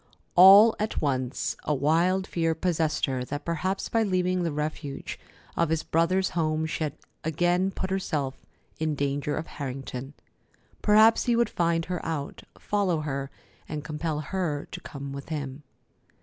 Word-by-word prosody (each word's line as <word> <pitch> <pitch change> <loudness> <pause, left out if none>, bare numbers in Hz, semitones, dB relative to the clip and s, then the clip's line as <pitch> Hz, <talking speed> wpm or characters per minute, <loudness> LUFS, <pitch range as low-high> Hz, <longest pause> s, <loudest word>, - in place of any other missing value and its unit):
All 200 +5 +9
at 215 +1 -1
once 130 -2 -1
a 150 - 0
wild 170 +7 +2
fear 165 -3 0
possessed 160 -2 0
her 130 -2 -2
that 145 +2 -5
perhaps 185 +4 -1
by 225 - +1
leaving 185 -3 +1
the 170 -2 0
refuge 150 -1 -4 0.4
of 170 -2 +1
his 160 0 0
brother's 185 +4 +1
home 160 -1 0
she 160 0 -2
had 145 - -4 0.3
again 175 +4 +1
put 190 -1 -4
herself 145 -8 -2 0.4
in 155 -1 0
danger 140 +1 -1
of 155 - -3
Harrington. 135 -1 -6 0.7
Perhaps 220 +2 +5
he 240 - +3
would 235 0 +2
find 170 -1 +1
her 180 -1 -4
out, 155 -4 -4 0.2
follow 190 -6 0
her, 135 -2 -3 0.4
and 150 -1 -4
compel 155 0 -3
her 155 -3 -2
to - - -7
come 140 -1 -7
with 140 +2 -8
him. 140 -3 -4
160 Hz, 155 wpm, -27 LUFS, 145-185 Hz, 0.7 s, All